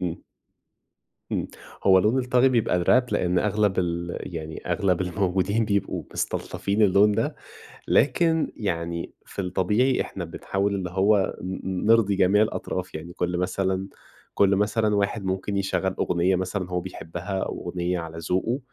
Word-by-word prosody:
امم. 90 -2 -3 1.1
امم، - - -1 0.4
هو 95 -1 +7
لون 105 +7 +2
الطاغي 125 0 +3
بيبقى 115 -7 +2
الراب؛ 125 +8 +3
لأن 90 0 +1
أغلب 105 -2 +1
ال 85 0 -1
يعني 80 -2 -6
أغلب 95 -4 +1
الموجودين 95 +4 0
بيبقوا 100 -2 -1
مستلطفين 100 +2 -1
اللون 105 +1 +5
ده، - - -1 0.5
لكن 160 +2 +2
يعني 85 -4 -3
في 100 - -5
الطبيعي 105 +8 +1
إحنا 90 - -4
بنحاول 95 +4 -2
اللي 95 -3 -3
هو 95 +1 +2
ن 95 0 -3
نرضي 110 -3 +4
جميع 100 +2 +4
الأطراف، 95 -4 -3
يعني 80 +2 -7
كل 90 0 -2
مثلًا 95 +1 -1 0.5
كل 100 -1 +4
مثلًا 105 +1 +1
واحد 100 +1 -1
ممكن 95 +2 -2
يشغل 95 -1 0
أغنية 90 +2 +2
مثلًا 95 0 -3
هو 90 0 0
بيحبها 90 +1 -5
أو - - -5
أغنية 90 0 -1
على 80 -1 -7
ذوقه؛ 95 +9 -1
95 Hz, 145 wpm, -25 LUFS, 90-105 Hz, 1.1 s, هو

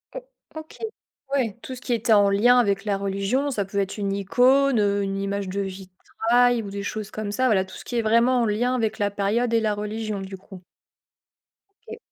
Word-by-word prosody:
O - - -3 0.4
OK. 315 0 -9 0.6
Ouais, 235 -7 0
tout 260 - -7
ce 250 - -12
qui 245 - -2
était 225 0 +2
en 205 -1 +5
lien 235 +5 +4
avec 200 -4 +1
la 200 -2 0
religion, 200 +8 -1
ça 205 -6 -2
peut 200 +1 -3
être 195 +1 -2
une 200 -1 -2
icône, 250 +6 +3
heu, 200 -1 +1
une 195 0 -3
image 200 -1 -3
de 200 +2 -2
vitrail 225 +6 0
ou 200 - -7
des 200 0 -5
choses 215 0 -5
comme 215 -1 -4
ça, 255 +4 +1
voilà, 190 -5 +2
tout 190 - -13
ce - - -10
qui 240 - -3
est - - +2
vraiment 235 +3 +3
en - - +2
lien 230 +4 0
avec 225 -3 -1
la 205 -1 0
période 225 +4 0
et 230 - +4
la 215 -1 0
religion 210 0 -4
du 190 0 -7
coup? 185 -1 -13 1.3
OK. - - -7
210 Hz, 220 wpm, -24 LUFS, 200-240 Hz, 1.3 s, en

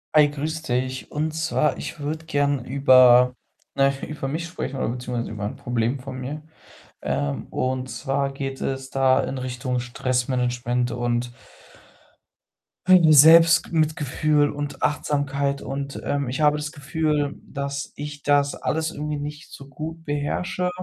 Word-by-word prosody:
Hi, 150 -1 +7
grüß 155 +2 -4
dich, 130 0 -2
und 155 +1 -2
zwar 160 -1 0
ich - - -7
würde 155 +2 -4
gerne 145 -4 0
über, 125 -2 +6 0.4
na 135 0 +4
ja, 135 0 -5
über 150 -3 -5
mich 160 +5 -3
sprechen 140 -5 -5
oder - - -1
beziehungsweise 125 -1 -4
über 105 -1 -5
'n 105 - -4
Problem 120 +2 -1
von 130 0 -7
mir. 145 +4 -5 0.6
Ähm, 70 -1 -2
und 130 0 -2
zwar 135 +1 -1
geht 135 -1 -5
es 135 0 -3
da 130 -1 +3
in 135 - -4
Richtung 125 0 -3
Stressmanagement 125 0 -1
und 120 0 -1 1.6
meine 175 -4 +7
Selbstg 165 +2 +7
mitgefühl 150 -2 +1
und 145 0 -5
Achtsamkeit 140 -1 0
und, 140 0 -5
ähm, 140 -1 -1
ich 130 +5 -3
habe 150 0 +4
das 150 0 -4
Gefühl, 145 0 -1
dass 140 0 -5
ich 145 -1 -7
das 145 -1 +2
alles 160 0 -2
irgendwie 150 0 -4
nicht 150 +1 -7
so 140 - -11
gut 160 +4 -7
beherrsche. 145 +5 -2
140 Hz, 145 wpm, -23 LUFS, 130-150 Hz, 1.6 s, Hi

